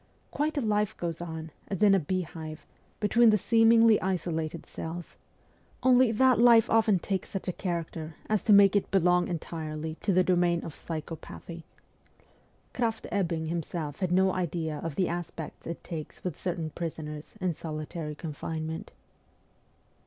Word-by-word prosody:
Quite 300 +2 -1
a - - +2
life 210 -2 0
goes 170 -1 -4
on, 160 -2 -6 0.2
as 195 0 -2
in 205 -2 +7
a 195 - +5
beehive, 160 -3 -4 0.3
between 225 +2 +5
the 215 - +5
seemingly 225 +1 +5
isolated 170 -3 -2
cells; 170 +1 -7 0.7
only 255 -2 +5
that 255 +2 +4
life 235 -2 +7
often 220 -3 +4
takes 190 +1 -3
such 195 - -5
a 180 - -1
character 165 -3 -4
as 215 -1 +1
to 220 - +1
make 200 -1 +7
it 200 - +1
belong 180 -2 +3
entirely 160 -2 -5
to 205 - +1
the 185 0 +4
domain 175 -2 +2
of 160 - -6
psycho 160 +1 -6
pathy. 165 +1 -10 1.1
Kraft 225 -2 -1
Ebbing 170 -5 0
himself 160 -2 -4
had 185 -2 -1
no 190 +1 +4
idea 165 -4 -2
of 165 -2 -5
the 185 0 +1
aspects 170 -2 -6
it 170 - -6
takes 160 -3 -7
with 180 -5 -3
certain 170 -3 -3
prisoners 150 -1 -6
in 185 -3 0
solitary 155 0 -5
con 155 0 -6
finement. 160 +5 -5
175 Hz, 155 wpm, -28 LUFS, 160-200 Hz, 1.1 s, in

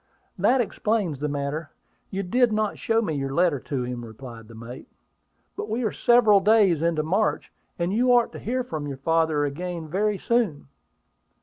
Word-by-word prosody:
"That 255 0 +4
explains 210 - -1
the 150 - -1
matter. 145 +2 -3 0.4
You 195 +1 -3
did 240 +6 +2
not 215 -1 -1
show 225 0 +1
me 160 - -2
your 135 -2 -3
letter 170 -5 +2
to 130 0 -3
him," 125 -1 -5
replied 115 0 -10
the 115 - -13
mate. 115 +3 -10 0.7
"But 420 +1 -5
we 245 +3 -1
are 215 - 0
several 230 -4 +5
days 195 -5 +4
into 165 -2 +1
March, 195 +8 0 0.3
and 175 +2 -1
you 250 +3 +3
ought 240 -1 +4
to - - -9
hear 255 +2 -2
from 155 -12 -5
your 140 -2 -5
father 160 0 +1
again 170 +3 -5
very 205 +5 0
soon." 205 - -1
170 Hz, 180 wpm, -25 LUFS, 145-220 Hz, 0.7 s, several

